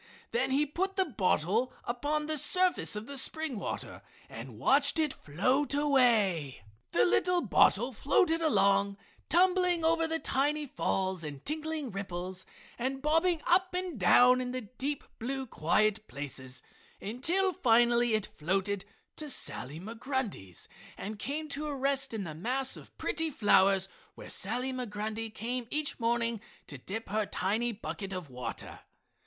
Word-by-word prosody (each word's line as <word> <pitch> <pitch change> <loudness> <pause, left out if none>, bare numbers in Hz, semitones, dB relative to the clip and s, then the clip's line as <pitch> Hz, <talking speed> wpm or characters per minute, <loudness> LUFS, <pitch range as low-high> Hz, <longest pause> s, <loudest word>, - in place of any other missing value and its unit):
Then 475 - +1
he 280 +3 +2
put 380 +7 -2
the 380 - +2
bottle 215 - +1
upon 290 +5 -1
the 310 -1 0
surface 365 - +3
of 210 +1 -5
the 280 +2 -2
spring 310 -3 -1
water - - -5 0.3
and 115 0 -9
watched 280 - +4
it 310 -3 +1
float 255 - 0
away. 220 - +2 0.3
The 120 - +4
little 350 - +2
bottle 240 +3 +3
floated 325 - +2
along, 200 -10 +3 0.3
tumbling 360 -1 +3
over 330 0 +3
the 325 0 0
tiny 295 0 0
falls 190 - -1
and 145 -3 -7
tinkling 310 -3 -3
ripples 185 -1 -5 0.3
and 265 +2 -2
bobbing 325 +2 +2
up 365 +1 +3
and 360 - -3
down 250 +8 +6
in 250 0 -4
the 255 - -3
deep, 260 +6 -4 0.2
blue, 265 +3 -3
quiet, 215 +2 +1
places 130 -2 -4 0.4
until 335 - +1
finally 240 -5 +4
it 215 - 0
floated 190 +4 -2 0.3
to 305 -1 -6
Sally 150 - -1
Migrundy's 225 - -4 0.3
and 210 +1 -6
came 300 +6 -3
to 295 +1 -3
rest 275 0 +1
in 220 -3 -3
the 160 -4 -6
mass 255 - -1
of - - -14
pretty 325 0 -1
flowers 195 -6 +4 0.3
where - - -10
Sally 250 +6 -1
Migrundy 220 -2 -4
came 235 +3 -4
each 300 0 -2
morning 230 -1 0 0.2
to 145 - -8
dip 210 - -6
her 210 0 0
tiny 220 +6 -1
bucket 200 -2 -6
of 180 -7 -6
water. 125 -2 -6
245 Hz, 145 wpm, -30 LUFS, 195-295 Hz, 0.4 s, down